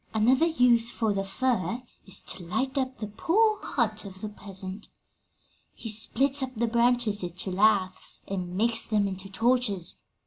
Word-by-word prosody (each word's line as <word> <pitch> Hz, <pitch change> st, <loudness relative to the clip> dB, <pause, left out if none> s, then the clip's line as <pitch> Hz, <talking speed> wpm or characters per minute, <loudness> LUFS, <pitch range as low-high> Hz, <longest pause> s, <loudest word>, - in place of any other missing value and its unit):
"Another 255 Hz, +9 st, +4 dB
use 245 Hz, -7 st, +3 dB
for 225 Hz, -3 st, 0 dB
the 195 Hz, 0 st, -1 dB
fir 235 Hz, +1 st, -1 dB, 0.2 s
is 195 Hz, -, -4 dB
to 185 Hz, -, -5 dB
light 260 Hz, -, -2 dB
up 260 Hz, -1 st, -1 dB
the 215 Hz, -, -4 dB
poor 410 Hz, -, +1 dB
hut 220 Hz, -4 st, -1 dB
of 190 Hz, -2 st, -11 dB
the 215 Hz, -, -4 dB
peasant. 195 Hz, -1 st, -6 dB, 0.9 s
'He 225 Hz, -, -5 dB
splits 270 Hz, +6 st, +3 dB
up 260 Hz, -1 st, -4 dB
the 235 Hz, +2 st, +1 dB
branches 235 Hz, -2 st, +2 dB
into 180 Hz, +2 st, -4 dB
laths 190 Hz, -1 st, +1 dB
and 180 Hz, -2 st, -4 dB
makes 230 Hz, +2 st, +3 dB
them 210 Hz, -2 st, 0 dB
into 190 Hz, 0 st, -6 dB
torches. 225 Hz, -4 st, +1 dB
220 Hz, 160 wpm, -27 LUFS, 195-250 Hz, 0.9 s, Another